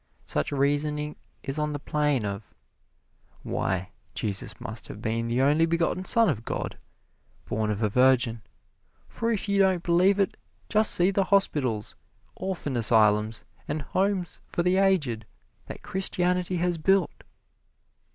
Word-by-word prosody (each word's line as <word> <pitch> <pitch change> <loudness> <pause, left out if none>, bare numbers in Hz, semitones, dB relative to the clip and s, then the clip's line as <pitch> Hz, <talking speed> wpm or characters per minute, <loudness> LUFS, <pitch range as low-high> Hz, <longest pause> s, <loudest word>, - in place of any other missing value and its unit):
Such 75 - -2
reasoning 150 +2 0 0.3
is 135 +2 -3
on 150 0 -1
the - - -2
plane 145 -5 0
of, 100 +1 -6 0.9
"Why, 95 0 -2 0.2
Jesus 100 -2 -4
must - - -7
have - - -9
been 115 +1 -2
the 120 +3 +1
only 150 +4 +3
begotten 170 +2 0
son 230 +1 +5
of 115 - -1
God, - - -4 0.7
born 110 0 -1
of 105 +1 -2
a 105 - +2
virgin, 125 -1 +3 0.7
for 230 0 -2
if 210 -2 -2
you 200 0 +1
don't 190 -3 +3
believe 180 +3 +3
it, 195 - 0 0.3
just 215 0 +3
see 180 +2 +3
the 195 0 +1
hospitals, 135 - +1 0.4
orphan 185 -8 -4
asylums 110 -1 +3 0.2
and 150 0 -3
homes 190 +1 -1
for 170 - -1
the 180 +1 +2
aged 150 - +1 0.4
that - - -9
Christianity 180 -1 0
has 175 -1 0
built!" 190 +1 +1
150 Hz, 140 wpm, -26 LUFS, 115-185 Hz, 0.9 s, son